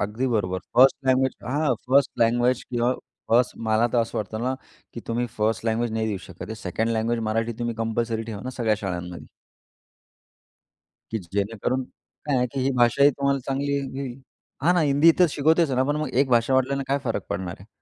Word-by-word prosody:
अगदी 105 Hz, +6 st, -1 dB
बरोबर. 100 Hz, -7 st, 0 dB, 0.2 s
First 130 Hz, +2 st, +7 dB
language 130 Hz, 0 st, +3 dB
हां, 140 Hz, +1 st, +1 dB
फर्स्ट 135 Hz, 0 st, +4 dB
लँग्वेज 120 Hz, +2 st, +2 dB
किंवा 120 Hz, 0 st, 0 dB, 0.4 s
फर्स्ट 120 Hz, 0 st, +3 dB
मला 110 Hz, +2 st, +3 dB
तर 120 Hz, -, +3 dB
असं 115 Hz, -1 st, -1 dB
वाटतं 110 Hz, +1 st, -4 dB
ना, 130 Hz, +2 st, 0 dB, 0.4 s
की 115 Hz, -, -5 dB
तुम्ही 120 Hz, +1 st, -1 dB
फर्स्ट 110 Hz, +1 st, 0 dB
लँग्वेज 115 Hz, +1 st, 0 dB
नाही 110 Hz, 0 st, -1 dB
देऊ 100 Hz, -3 st, -2 dB
शकत 90 Hz, 0 st, -9 dB
हे. 110 Hz, -, -4 dB
सेकंड 110 Hz, +2 st, -2 dB
लँग्वेज 115 Hz, +1 st, 0 dB
मराठी 115 Hz, +1 st, 0 dB
तुम्ही 120 Hz, -1 st, -2 dB
कंपल्सरी 115 Hz, 0 st, -1 dB
ठेवा 110 Hz, -3 st, -7 dB
ना 130 Hz, -, -3 dB
सगळ्या 110 Hz, -2 st, +3 dB
शाळांमध्ये. 90 Hz, -3 st, -5 dB, 1.8 s
की 110 Hz, -, -1 dB
जेणेकरून 100 Hz, +7 st, -2 dB
काय 145 Hz, +2 st, -6 dB
आहे 125 Hz, 0 st, +2 dB
की 135 Hz, -, -2 dB
ही 130 Hz, +1 st, +1 dB
भाषा 120 Hz, +2 st, +3 dB
ही 145 Hz, -, +7 dB
तुम्हाला 140 Hz, 0 st, 0 dB
चांगली 140 Hz, +1 st, -1 dB
ये 140 Hz, -, +1 dB, 0.2 s
येईल. 130 Hz, -1 st, -7 dB, 0.4 s
हां 175 Hz, +4 st, +4 dB
ना 175 Hz, -, +3 dB
हिंदी 145 Hz, +1 st, +4 dB
इथे 175 Hz, +1 st, +5 dB
शिकवतेच 160 Hz, +2 st, +2 dB
ना. 130 Hz, 0 st, +2 dB
पण 145 Hz, +2 st, 0 dB
मग 155 Hz, 0 st, -2 dB
एक 135 Hz, +2 st, +2 dB
भाषा 120 Hz, +2 st, +3 dB
वाढल्याने 135 Hz, +1 st, +1 dB
काय 140 Hz, +1 st, +1 dB
फरक 115 Hz, -, -1 dB
पडणार 90 Hz, -1 st, -3 dB
आहे. 100 Hz, -, -14 dB
120 Hz, 195 wpm, -24 LUFS, 110-135 Hz, 1.8 s, फर्स्ट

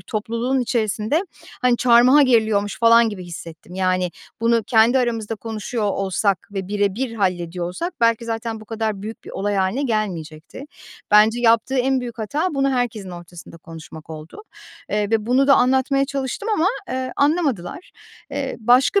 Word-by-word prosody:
topluluğun 230 Hz, +4 st, -2 dB
içerisinde, 230 Hz, -, -1 dB, 0.4 s
hani, 250 Hz, -2 st, +3 dB
çarmıha 250 Hz, +4 st, +5 dB
geriliyormuş 220 Hz, -5 st, +2 dB
falan 230 Hz, 0 st, +5 dB
gibi 190 Hz, -4 st, -7 dB
hissettim. 170 Hz, 0 st, -10 dB
Yani 185 Hz, -1 st, 0 dB, 0.3 s
bunu 230 Hz, 0 st, +2 dB
kendi 235 Hz, +3 st, +4 dB
aramızda 230 Hz, -3 st, -1 dB
konuşuyor 220 Hz, +1 st, -4 dB
olsak 195 Hz, -1 st, -1 dB
ve 195 Hz, -2 st, -4 dB
bire 205 Hz, -2 st, 0 dB
bir 245 Hz, +1 st, -3 dB
hallediyor 180 Hz, -4 st, -2 dB
olsak 340 Hz, -, -4 dB
belki 230 Hz, 0 st, +2 dB
zaten 225 Hz, -1 st, -4 dB
bu -, -, -12 dB
kadar 220 Hz, -2 st, -3 dB
büyük 220 Hz, +2 st, -8 dB
bir -, -, -9 dB
olay 205 Hz, +1 st, -2 dB
hâline 190 Hz, +8 st, 0 dB
gelmeyecekti. 185 Hz, -, -4 dB, 0.5 s
Bence 215 Hz, +3 st, +5 dB
yaptığı 230 Hz, +2 st, +3 dB
en 260 Hz, +1 st, +1 dB
büyük 240 Hz, -1 st, -7 dB
hata 295 Hz, -, -2 dB
bunu 275 Hz, 0 st, +1 dB
herkesin 235 Hz, -7 st, -2 dB
ortasında 175 Hz, -1 st, -11 dB
konuşmak 160 Hz, -1 st, -12 dB
oldu. 160 Hz, -, -10 dB, 0.5 s
Eee, 210 Hz, 0 st, -1 dB
ve 220 Hz, -1 st, 0 dB
bunu 260 Hz, +3 st, +3 dB
da 275 Hz, -, +7 dB
anlatmaya 265 Hz, +2 st, +2 dB
çalıştım 275 Hz, -, -4 dB
ama, 330 Hz, -, +1 dB, 0.2 s
eee, 255 Hz, 0 st, -3 dB
anlamadılar. 285 Hz, -, -1 dB, 0.4 s
Eee, -, -, -3 dB
başka 250 Hz, -, +4 dB
225 Hz, 155 wpm, -21 LUFS, 195-255 Hz, 0.5 s, da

